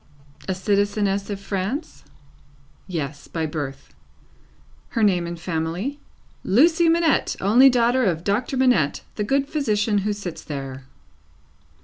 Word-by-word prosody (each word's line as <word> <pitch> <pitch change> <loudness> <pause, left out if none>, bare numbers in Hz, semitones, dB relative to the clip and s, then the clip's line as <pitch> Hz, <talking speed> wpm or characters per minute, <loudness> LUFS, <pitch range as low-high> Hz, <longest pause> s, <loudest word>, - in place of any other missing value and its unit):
A 190 - 0
citizeness 200 +1 0
of 200 -1 -4
France? 200 - -4 0.8
Yes. 150 -5 -5
By 160 -1 -3
birth. 145 -3 -6 1.0
Her 230 - 0
name 180 -4 +2
and 170 0 -6
family? 170 - -3 0.4
"Lucie 325 - +4
Manette, 330 -2 +2
only 240 +8 +6
daughter 245 +1 +2
of 170 -4 0
Doctor 235 +7 -1
Manette, 245 - +2
the 210 - -2
good 275 +6 +1
physician 215 -8 0
who 210 +2 -1
sits 180 -6 -7
there." 135 -3 -6
200 Hz, 120 wpm, -23 LUFS, 170-250 Hz, 1.0 s, only